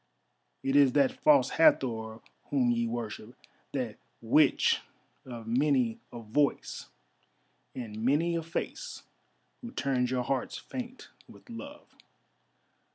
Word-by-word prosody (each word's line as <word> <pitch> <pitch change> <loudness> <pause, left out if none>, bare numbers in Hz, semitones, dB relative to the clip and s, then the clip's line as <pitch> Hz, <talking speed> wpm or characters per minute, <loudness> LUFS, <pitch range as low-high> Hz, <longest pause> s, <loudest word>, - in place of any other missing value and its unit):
"It 135 +1 0
is 140 -3 +6
that 140 -2 +4
False 140 -4 +5
Hathor 110 -7 +3 0.2
whom 125 -4 +2
ye 115 0 0
worship, 115 0 -5 0.4
that - - -3 0.2
Witch - - +3 0.4
of 120 -3 -8
many 125 -1 +1
a 120 - -8
voice 140 +7 -1 0.9
and 110 -3 -6
many 150 +7 +2
a 165 - 0
face 165 +1 -5 0.6
who 240 - -7
turns 130 - 0
your 125 -1 0
hearts 130 0 -2
faint 255 0 -8 0.2
with - - -15
love. 285 +6 -10
130 Hz, 115 wpm, -30 LUFS, 115-150 Hz, 0.9 s, is